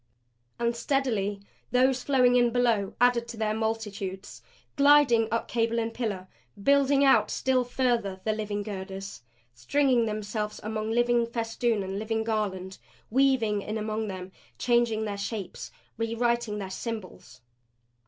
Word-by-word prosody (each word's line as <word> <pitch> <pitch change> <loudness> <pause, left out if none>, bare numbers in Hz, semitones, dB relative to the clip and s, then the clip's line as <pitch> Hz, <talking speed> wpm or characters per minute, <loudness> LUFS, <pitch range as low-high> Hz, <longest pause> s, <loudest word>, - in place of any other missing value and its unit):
And 235 0 0
steadily 230 -6 -1 0.3
those 255 +1 +3
flowing 250 -2 +3
in 240 -1 +4
below 230 -5 +1
added 245 -1 +3
to 235 - -8
their 215 -1 0
multitudes; 210 -4 -4 0.3
gliding 280 -6 +5
up 230 - -1
cable 230 0 0
and 225 0 -1
pillar; 205 -7 -3 0.4
building 280 +2 +4
out 270 - +5
still 260 -1 +1
further 240 -6 -1
the 215 - +1
living 210 -1 -3
girders, 195 - -7 0.3
stringing 240 - +2
themselves 210 0 -3
upon 215 0 -4
living 240 -1 +3
festoon 230 -2 -1
and 190 +1 -4
living 220 +1 -1
garland, 195 -4 -3 0.3
weaving 245 -5 +2
in 215 +2 -4
among 215 0 -2
them, 185 -1 -6 0.3
changing 235 -3 +1
their 200 -1 -4
shapes, 200 -2 -5 0.3
rewriting 230 -1 0
their 195 -2 -5
symbols. 190 - -7
225 Hz, 135 wpm, -27 LUFS, 205-240 Hz, 0.4 s, gliding